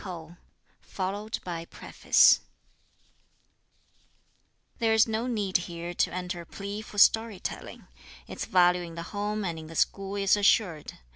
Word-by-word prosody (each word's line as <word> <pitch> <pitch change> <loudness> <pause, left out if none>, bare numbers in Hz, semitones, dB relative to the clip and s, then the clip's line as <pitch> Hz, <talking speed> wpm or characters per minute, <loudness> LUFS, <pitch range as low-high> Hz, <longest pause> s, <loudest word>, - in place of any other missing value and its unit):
_ 185 -3 -5
Preface - - +4 2.4
There 225 -1 +2
is 220 +1 +5
no 225 +2 -2
need 205 -6 0
here 175 0 -6
to - - 0
enter 180 0 -4
a - - -12
plea 200 +1 -6
for 215 - -12
story 220 -1 +4
telling. - - -7 0.4
Its - - -6
value 180 -1 +3
in 170 -1 -8
the 170 - -5
home 210 0 -2
and 165 -3 -3
in 160 - -10
the 165 - -11
school 195 +3 0
is 195 -1 +3
assured. 200 -6 +1
195 Hz, 135 wpm, -27 LUFS, 175-210 Hz, 2.4 s, is